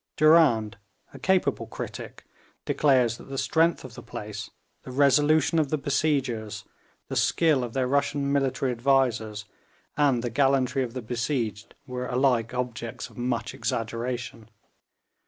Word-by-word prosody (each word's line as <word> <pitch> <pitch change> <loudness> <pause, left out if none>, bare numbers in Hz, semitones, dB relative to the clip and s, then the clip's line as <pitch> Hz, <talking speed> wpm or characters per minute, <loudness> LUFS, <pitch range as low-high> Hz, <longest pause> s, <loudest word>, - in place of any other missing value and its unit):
Durand, 140 -10 +4 0.3
a 135 - -10
capable 190 +6 +1
critic, - - -8 0.4
declares 125 -5 +2
that - - -13
the 135 - -5
strength 165 +4 +2
of 125 - -10
the - - -9
place, 105 0 -7 0.3
the - - -11
resolution 145 +4 +3
of 150 -3 +1
the 155 - 0
besiegers, 135 -7 -1 0.4
the - - -5
skill 155 -6 +2
of 120 -2 -5
their 130 -1 0
Russian 140 +1 0
military 135 -2 0
advisers, 120 -4 +1 0.5
and 135 -5 +2
the 120 - -2
gallantry 135 0 +2
of 125 -1 -4
the 125 - -4
besieged, 115 -2 -3
were 125 -1 -4
alike 125 -3 +1
objects 125 -1 -5
of - - -19
much 120 -1 -2
exaggeration. 115 +1 -4
130 Hz, 135 wpm, -26 LUFS, 115-140 Hz, 0.5 s, Durand